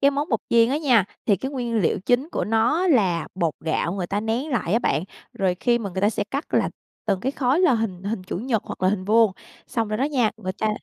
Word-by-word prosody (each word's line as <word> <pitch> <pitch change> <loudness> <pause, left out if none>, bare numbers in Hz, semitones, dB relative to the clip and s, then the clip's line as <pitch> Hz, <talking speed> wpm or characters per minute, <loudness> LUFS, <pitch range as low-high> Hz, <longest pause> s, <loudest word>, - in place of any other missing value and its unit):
Cái 280 - +5
món 285 +2 -2
bột 225 - 0
chiên 230 -1 +5
á 280 - +1
nha, 255 - +4 0.2
thì 205 - +4
cái 265 +8 -4
nguyên 245 -4 -3
liệu 175 - +1
chính 250 +5 +2
của - - -1
nó 225 - +2
là 190 - +2
bột 170 -4 0
gạo 160 +1 -1
người 185 -2 -3
ta 200 +3 -1
nén 230 +7 -2
lại 210 - -1
á 230 - +4
bạn, 180 -8 0 0.3
rồi 190 -2 0
khi 240 -1 +3
mà 200 -4 -4
người 190 - -3
ta 205 - +4
sẽ 205 -2 -2
cắt 280 +7 -4
là - - +2 0.4
từng 195 -3 +1
cái 265 +6 -1
khối, 270 +4 +1
là 355 -9 +5
hình 200 -5 -2
hình 200 -1 -3
chữ - - -4
nhật 225 -1 -1
hoặc - - -8
là 185 - +4
hình 190 -1 -1
vuông, 220 0 +4 0.3
xong 225 -2 -2
rồi 215 0 -2
đó 265 - +2
nha, 260 -7 +1
người 185 -4 -4
ta 215 +3 -1
225 Hz, 265 wpm, -23 LUFS, 195-255 Hz, 0.4 s, Cái